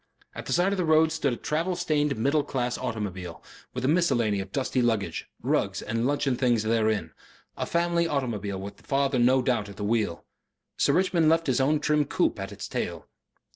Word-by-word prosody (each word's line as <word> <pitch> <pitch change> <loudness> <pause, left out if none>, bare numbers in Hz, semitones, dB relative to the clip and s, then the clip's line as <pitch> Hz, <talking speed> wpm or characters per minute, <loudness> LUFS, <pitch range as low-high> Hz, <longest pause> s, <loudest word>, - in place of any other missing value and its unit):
At - - -8
the - - -1
side 180 +3 +3
of - - -2
the 180 - +1
road 160 0 +4
stood 155 -4 0
a - - -4
travel 165 +4 -1
stained 150 -6 0
middle 140 +6 +2
class 125 -4 -2
automobile, 95 -6 -5 0.3
with 125 0 -2
a - - +2
miscellany 120 - +2
of 95 0 -6
dusty 130 0 0
luggage, 105 -8 -1
rugs - - 0
and 115 +2 -1
luncheon 140 -2 +1
things 120 -3 +2
therein 110 -6 +1 0.4
a - - -3
family 170 0 +1
automobile 110 -10 -2
with 100 +1 -8
father 135 -1 +1
no 125 +2 +4
doubt 120 -5 0
at 100 - -11
the 105 - -5
wheel. 105 -5 -1 0.5
Sir - - +2
Richmond 175 -3 +3
left 165 +1 +3
his 130 -1 +1
own 150 +3 +2
trim 150 0 +2
coupe 140 - 0
at 95 0 -5
its 100 - -7
tail. - - -4
130 Hz, 195 wpm, -27 LUFS, 110-155 Hz, 0.5 s, road